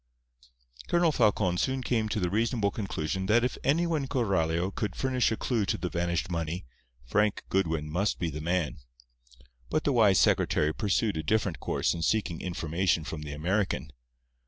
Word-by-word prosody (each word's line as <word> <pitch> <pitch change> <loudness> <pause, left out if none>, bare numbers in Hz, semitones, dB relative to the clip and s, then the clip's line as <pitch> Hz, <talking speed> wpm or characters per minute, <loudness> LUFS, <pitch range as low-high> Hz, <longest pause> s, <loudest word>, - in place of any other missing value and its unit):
Colonel 170 -1 +3
Falcon 105 -8 +2
soon 130 0 0
came 110 -4 0
to 105 - -1
the 90 -3 -1
reasonable 110 -1 +1
conclusion 95 -2 -3
that 115 +3 +4
if 125 - 0
anyone 160 +2 +2
in 135 - -4
Coralio 95 - 0
could 105 -4 -3
furnish 130 -3 +1
a 110 - -1
clue 115 -5 0
to - - 0
the 90 +1 -3
vanished 85 0 -1
money, 85 -1 -3 0.4
Frank 105 - +1
Goodwin 80 -5 0
must 90 +6 0
be 85 -2 -2
the 75 +1 -5
man. 85 -2 -1 0.9
But 155 - 0
the 145 - +1
wise 105 -6 +5
secretary 75 -1 +3
pursued 105 -1 0
a - - -1
different 100 +1 0
course - - 0
in 85 - -5
seeking 90 -3 0
information 85 -1 0
from 80 0 -6
the 75 -1 -6
American. 85 -2 -1
95 Hz, 170 wpm, -28 LUFS, 80-110 Hz, 0.9 s, wise